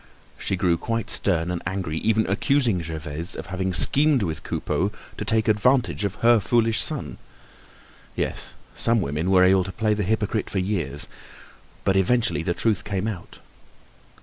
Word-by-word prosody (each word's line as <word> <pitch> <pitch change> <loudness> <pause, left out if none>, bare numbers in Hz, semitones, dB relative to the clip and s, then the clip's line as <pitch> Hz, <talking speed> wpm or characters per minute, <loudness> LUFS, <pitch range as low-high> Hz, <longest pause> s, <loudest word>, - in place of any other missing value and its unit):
She - - -1
grew 90 -2 +2
quite 115 +4 -2
stern 85 -3 0
and 85 -1 -3
angry, 85 -3 -3
even 110 0 +2
accusing 115 -1 +1
Gervaise 80 0 -4
of - - -6
having 95 0 -1
schemed 140 - +3
with 80 -5 -3
Coupeau 100 +4 -1 0.2
to - - -4
take 110 +1 +1
advantage 120 +2 +2
of 100 0 -2
her 120 -1 +7
foolish 115 +2 +2
son. 150 -5 -4 1.0
Yes, - - -3 0.2
some 115 0 +3
women 75 +1 -1
were 95 -1 +5
able 95 0 +5
to 95 - -6
play 110 +1 0
the 105 - -1
hypocrite 105 +1 -1
for - - -4
years, 90 -7 -1 0.8
but 95 - +2
eventually 95 -5 +2
the 85 +1 -1
truth 110 -4 +1
came 100 0 -2
out. 100 -6 -7
100 Hz, 160 wpm, -24 LUFS, 90-110 Hz, 1.0 s, her